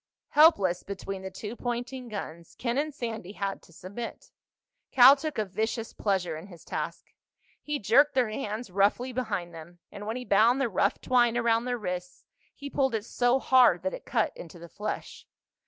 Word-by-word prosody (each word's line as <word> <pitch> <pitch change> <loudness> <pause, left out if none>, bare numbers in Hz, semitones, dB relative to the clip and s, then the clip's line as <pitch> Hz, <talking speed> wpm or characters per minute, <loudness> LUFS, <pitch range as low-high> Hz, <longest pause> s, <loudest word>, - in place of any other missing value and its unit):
Helpless 200 - +5
between 195 -1 -6
the 190 - -6
two 210 +4 -7
pointing 245 +1 -4
guns, 170 -6 -7
Ken 245 +2 -1
and 305 +1 -1
Sandy 225 -8 -6
had 195 -1 -3
to - - -20
submit. 200 +8 -8 0.6
Cal 260 +2 +8
took 305 +2 -5
a 215 - 0
vicious 220 +4 -3
pleasure 185 -5 -1
in 160 +5 -9
his 175 -4 -14
task. - - -5 0.5
He 295 0 -2
jerked 280 +6 +4
their 245 -4 +2
hands 215 -2 -4
roughly 205 +7 +1
behind 200 -8 -3
them, 165 +2 -11
and 205 +1 -8
when 220 - -2
he 250 0 -5
bound 230 +6 +4
the 265 -3 +1
rough 190 - +1
twine 240 -2 +3
around 230 0 +2
their 250 -1 -1
wrists 180 -3 -6 0.3
he 285 - -8
pulled 265 -3 0
it 215 -1 -3
so 245 +1 +2
hard 250 -10 +4
that 185 - -1
it - - -8
cut 225 -3 0
into 170 +1 -10
the 170 0 -11
flesh. 210 +4 -6
220 Hz, 185 wpm, -28 LUFS, 190-250 Hz, 0.6 s, Cal